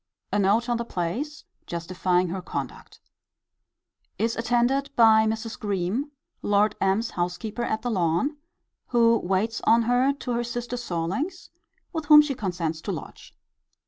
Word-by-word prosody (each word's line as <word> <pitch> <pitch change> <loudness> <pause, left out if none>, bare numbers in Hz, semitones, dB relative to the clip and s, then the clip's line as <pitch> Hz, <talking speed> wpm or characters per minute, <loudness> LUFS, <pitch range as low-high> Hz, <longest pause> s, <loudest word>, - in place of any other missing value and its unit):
[A 205 - +2
note 205 +5 +2
on 240 -1 +1
the 235 - -2
place, 235 - -4 0.2
justifying 180 +1 0
her 185 +2 -4
conduct.] - - -6 1.2
Is 230 +1 0
attended 245 +4 +1
by 220 -1 +6
Mrs. 225 +1 -3
Greme, 205 +7 -1 0.3
Lord 205 +1 +2
M.'s 195 +4 +1
housekeeper 180 +6 -3
at 220 -1 -2
The 245 - -1
Lawn, 185 - 0 0.5
who 230 -1 +4
waits 195 +5 -1
on 230 +1 +5
her 245 +3 +3
to 275 -3 -5
her 240 0 0
sister 240 +1 -4
Sorlings, 240 - -3 0.4
with 320 -2 -3
whom 300 0 +9
she 295 -2 -2
consents 175 -9 -3
to 200 - -3
lodge. 160 -6 -9
225 Hz, 145 wpm, -25 LUFS, 185-245 Hz, 1.2 s, whom